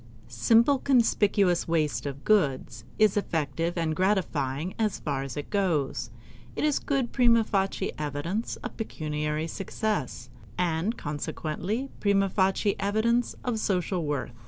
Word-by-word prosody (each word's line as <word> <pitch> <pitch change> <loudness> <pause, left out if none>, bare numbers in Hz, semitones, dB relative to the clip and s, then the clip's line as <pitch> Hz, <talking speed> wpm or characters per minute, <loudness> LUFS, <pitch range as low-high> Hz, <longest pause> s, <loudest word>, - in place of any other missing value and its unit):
Simple 230 - +4
conspicuous 205 -8 +3
waste 155 -3 0
of 140 0 -6
goods 135 - +1
is 215 -2 +4
effective 165 -2 -1
and 160 -2 0
gratifying 170 -5 0
as 215 -3 +1
far 140 -3 -2
as 135 +1 -6
it 145 - -6
goes; 165 - 0 0.5
it - - -2
is 300 -2 +2
good 270 -4 -1
prima 235 -3 +4
facie 195 -2 -1
evidence 155 +9 -2
of - - -6
pecuniary 150 -6 -2
success, 165 - -3 0.3
and 180 +6 0
consequently 160 - -3
prima 195 -1 +2
facie 195 +1 +1
evidence 225 +4 +1
of 240 -3 -1
social 180 -3 0
worth. 145 -5 -3
185 Hz, 130 wpm, -27 LUFS, 150-215 Hz, 0.5 s, Simple